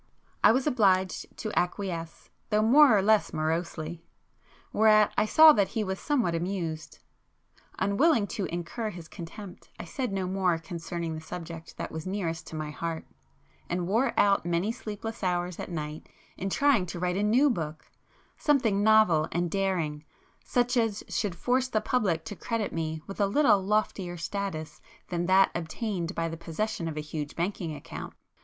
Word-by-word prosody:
I - - +8
was 255 +3 +1
obliged 195 -9 +2
to 215 - -4
acquiesce, 175 -2 -3 0.2
though 215 -1 +3
more 255 0 +7
or 195 - +2
less 215 +1 +3
morosely,—whereat 170 +6 0
I - - +3
saw 315 +6 +8
that 200 -6 +2
he 220 - -2
was 190 -1 -3
somewhat 250 - +1
amused. 165 -2 -3 0.8
Unwilling 205 - +3
to 205 -5 -2
incur 175 +7 -4
his 175 -5 -9
contempt 180 +2 -10
I - - -6
said 250 +6 -3
no 190 -1 -1
more 185 -2 +1
concerning 165 0 -5
the 155 - -6
subject 165 0 -7
[p - - -12
214] - - -6
that - - -6
was 160 0 -5
the - - -3
nearest 165 -5 -3
to - - -8
my 155 -1 -4
heart, 165 +1 -4 0.6
and 175 0 -1
wore 230 +6 +1
out 200 -1 +4
many 175 +5 0
sleepless 225 0 -6
hours 180 -1 -1
at - - -5
night 155 -2 -5 0.3
in 195 - -3
trying 265 -5 +3
to 175 - -6
write 180 0 0
a - - 0
new 245 +7 +4
book,—something 200 - -2
novel 205 -8 +5
and 175 -1 -1
daring, 175 -7 -1 0.4
such 245 0 +1
as 225 -3 0
should 200 -5 -1
force 255 +6 +1
the 220 -4 0
public 190 -10 0
to 205 - -6
credit 230 +1 -3
me 160 -1 -3
with 195 +1 -5
a 200 - +4
little 210 -2 +4
loftier 195 -3 -1
status 165 -4 -4 0.3
than 175 -1 -1
that 190 +1 +5
obtained 175 +1 -3
by 165 0 -1
the 165 0 -5
possession 170 +2 -3
of 155 -2 -5
a - - -1
huge 150 -1 -5
banking 170 -2 -2
account. - - -8
185 Hz, 170 wpm, -28 LUFS, 165-215 Hz, 0.8 s, I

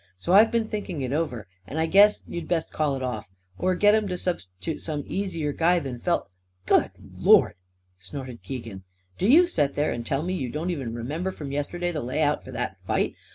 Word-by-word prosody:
So 170 - -1
I've 215 +3 +8
been 230 -1 +1
thinking 205 -8 -4
it 130 +1 -2
over, 145 -9 -2 0.2
and 145 - -6
I 160 - +2
guess 205 +5 +5
you'd 170 -2 -5
best 165 -2 0
call 150 -3 +1
it 130 - -4
off; 110 -7 -4 0.3
or 185 0 +1
get 205 +3 +5
'em 215 -1 +2
to 180 - -2
subst'toot 160 - -4
some 150 -3 -3
easier 170 -7 -2
guy 175 +4 +3
than 135 -7 -4
Felt 175 - 0 0.2
" 90 0 -43
"Good - - +4 0.3
Lord!" - - +6 0.5
snorted 125 +5 -8
Keegan. 115 -7 -7 0.4
"Do 195 - +2
you 320 +9 +7
set 145 - 0
there 150 +1 +1
and 120 - -4
tell 135 +5 -1
me 180 +2 -2
you 135 -9 -2
don't 160 +7 -2
even 130 -9 -4
remember 150 +11 -3
from 145 -7 -7
yesterday 175 +5 -2
the 155 -3 -3
layout 145 +4 0
for - - -12
that - - -4
fight? - - -1
155 Hz, 210 wpm, -26 LUFS, 130-180 Hz, 0.5 s, I've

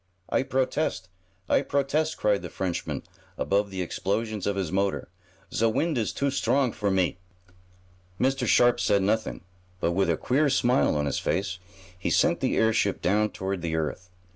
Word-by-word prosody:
"I - - +2
protest! 130 -6 -1 0.4
I - - +3
protest!" 140 +3 0
cried 105 -1 +2
the - - -6
Frenchman, 90 -3 -3 0.3
above 100 +1 +1
the 95 -1 -3
explosions 105 +3 -2
of 100 - 0
his 95 -5 -2
motor. 95 -2 -1 0.4
"Ze 115 - +2
wind 155 +8 0
is 115 -4 0
too 140 0 -1
strong 135 -2 +1
for 105 -2 -1
me!" 95 -2 +1 1.0
Mr. 130 -1 +1
Sharp 120 +2 +4
said 100 -2 +2
nothing, 110 +3 0 0.4
but, 85 - +1
with 95 0 +1
a 85 - +2
queer 140 +4 +2
smile 125 - +3
on 75 0 0
his 70 - -1
face 95 -2 -1 0.4
he - - -1
sent - - +3
the - - 0
airship 110 -3 +2
down 105 +3 +2
toward 95 -2 -4
the 80 -1 -2
earth. 80 +3 -3
105 Hz, 165 wpm, -26 LUFS, 95-125 Hz, 1.0 s, Sharp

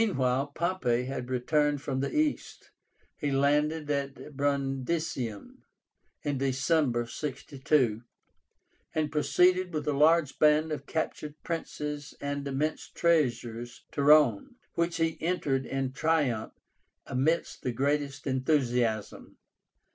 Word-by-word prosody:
Meanwhile 135 - +1
Pompey 170 -9 0
had 130 -1 -5
returned 145 +3 +1
from 135 -1 -3
the 140 - -1
East. 305 -1 -2 0.5
He 145 - -1
landed 150 +3 +1
at 140 +1 -4
Brundisium 135 -4 -2 0.7
in 145 -2 -1
December, 135 -2 +1
62, 130 -3 -1 0.9
and 155 -2 0
proceeded 180 +4 +3
with 155 -2 -3
a 150 - +2
large 155 +1 +3
band 155 +1 +4
of 145 -2 -4
captured 150 -2 -3
princes 150 -3 -4
and 140 0 -3
immense 145 +3 -2
treasures 120 -8 0
to - - -2
Rome, 145 - +5 0.2
which 170 0 0
he 165 -1 -1
entered 145 -6 0
in 135 -1 -2
triumph 135 -8 0 0.5
amidst 140 +6 0
the 125 - -1
greatest 140 +3 -1
enthusiasm. 125 -5 0
145 Hz, 110 wpm, -29 LUFS, 130-155 Hz, 0.9 s, Rome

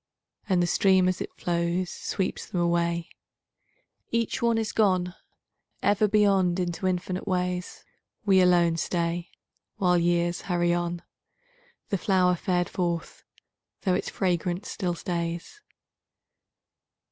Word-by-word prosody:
And 180 -2 +3
the - - +3
stream 185 +1 +4
as 185 -1 -1
it - - -4
flows 175 +1 -1
Sweeps 190 -2 -3
them 180 - -3
away, 170 -1 +1 1.0
Each 230 -1 -1
one 235 -1 +2
is 220 -2 -1
gone 185 -4 +2 0.7
Ever 205 +1 +3
beyond 195 -4 +3
into 180 +1 -1
infinite 185 +1 -2
ways. 180 -1 -2 0.4
We 190 -2 +5
alone 175 -2 +4
stay 170 0 -1 0.5
While 180 -2 +3
years 175 0 +1
hurry 175 -1 +2
on, 175 0 -2 0.9
The 195 - 0
flower 185 -1 +3
fared 175 0 0
forth, 170 -2 -3 0.6
though 185 - +1
its - - -1
fragrance 180 0 -1
still 180 -4 -2
stays. 170 - -4
180 Hz, 120 wpm, -27 LUFS, 175-190 Hz, 1.0 s, We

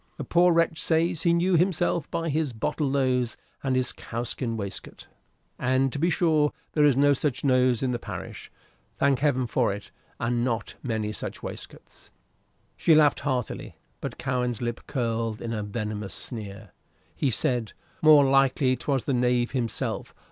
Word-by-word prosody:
"The 145 - -4
poor 175 +6 +4
wretch 165 -1 +2
says 165 -1 +1
he 170 - +3
knew 175 +2 +2
himself 175 -2 +1
by 165 0 -2
his 150 -3 0
bottle 135 +6 -1
nose 130 -3 +1 0.3
and 135 -1 +1
his 130 -1 +1
cowskin 115 0 -4
waistcoat; 100 -2 -7 0.5
and, 130 +1 +1
to 145 - -3
be 170 +4 +2
sure, 155 -4 +2 0.2
there 150 - +3
is 140 -3 +4
no 145 +1 +5
such 135 -2 -1
nose 130 -2 +3
in 130 - +1
the 120 - -2
parish - - -8 0.5
thank 140 -2 +2
Heaven 135 -3 +2
for't! 115 -4 -1 0.3
and 120 0 0
not 115 -2 -2
many 110 -4 -2
such - - -6
waistcoats." - - -10 0.7
She 165 - +4
laughed 150 -2 +5
heartily, 130 -5 -3 0.2
but - - -6
Cowen's 125 -3 -1
lip 120 -1 -3
curled 115 -3 -2
in 115 -1 -4
a 105 - -2
venomous 105 -1 -4
sneer. 105 -3 -7 0.4
He 140 - +1
said: 120 -2 -1 0.3
"More 150 -2 +7
likely 135 -1 +3
'twas 135 +1 -1
the 140 - 0
knave 125 -1 +1
himself. 120 -4 -3
130 Hz, 160 wpm, -26 LUFS, 120-150 Hz, 0.7 s, More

